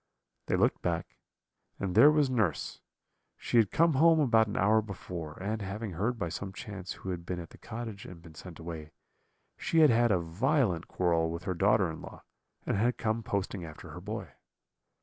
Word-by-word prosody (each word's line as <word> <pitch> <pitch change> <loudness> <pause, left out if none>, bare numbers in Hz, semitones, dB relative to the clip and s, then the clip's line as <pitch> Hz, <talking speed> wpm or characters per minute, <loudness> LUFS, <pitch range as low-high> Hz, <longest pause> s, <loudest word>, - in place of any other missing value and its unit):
"They - - +2
looked - - +2
back, 85 -1 -3 0.6
and 95 -2 -2
there 145 - +8
was 150 -2 +3
nurse; 110 - -1 0.6
she - - 0
had 110 -4 +5
come 165 0 +3
home 160 +4 +5
about 115 -6 +4
an 105 - -4
hour 110 +3 +4
before, 90 -7 -7
and 105 +3 -3
having 100 +2 -4
heard 105 +8 -1
by 90 - -2
some 95 +3 -5
chance 100 -3 -6
who 95 - -6
had 85 -1 -5
been 90 +1 -4
at 85 - -9
the - - -15
cottage 110 -3 -7
and 90 -2 -10
been 85 -1 -14
sent 85 +1 -10
away, 80 -2 -8 0.7
she 165 - +2
had 150 -4 +7
had 120 +1 +4
a 95 - +4
violent 90 - 0
quarrel 85 -2 +1
with 85 +2 -5
her 95 - -1
daughter 100 +2 +3
in 80 - -8
law, - - -11 0.4
and - - 0
had 120 +4 +1
come 110 +1 -1
posting 100 -4 -3
after 80 -2 -10
her - - -8
boy. - - -5
100 Hz, 195 wpm, -30 LUFS, 85-115 Hz, 0.7 s, there